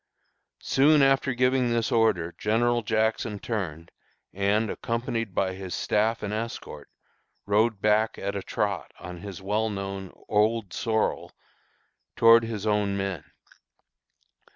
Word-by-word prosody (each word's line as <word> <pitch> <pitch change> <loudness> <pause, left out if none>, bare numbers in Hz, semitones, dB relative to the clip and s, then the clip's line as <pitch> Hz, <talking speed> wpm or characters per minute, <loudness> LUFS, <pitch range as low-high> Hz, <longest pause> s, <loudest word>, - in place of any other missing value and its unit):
Soon 145 +1 +4
after 135 -1 +2
giving 125 0 +2
this 115 -1 0
order 100 -7 +2
General 120 +3 +1
Jackson 110 0 0
turned, 85 -7 -5 0.4
and, 100 +3 +1
accompanied 115 -3 -3
by 95 -1 0
his 95 -1 -6
staff 110 +2 0
and 105 0 -3
escort, 115 +2 -6 0.6
rode 105 +1 +2
back 105 +1 +2
at 100 +1 -4
a 100 - -2
trot, 100 -2 -2
on 90 0 -8
his 95 -1 -8
well 105 +3 0
known 100 -2 -5 0.2
'Old 105 -2 +1
Sorrel,' 110 -1 -1 0.8
toward 115 0 +7
his 110 -2 -5
own 105 -2 +1
men. 95 -5 -3
105 Hz, 125 wpm, -26 LUFS, 100-115 Hz, 0.8 s, toward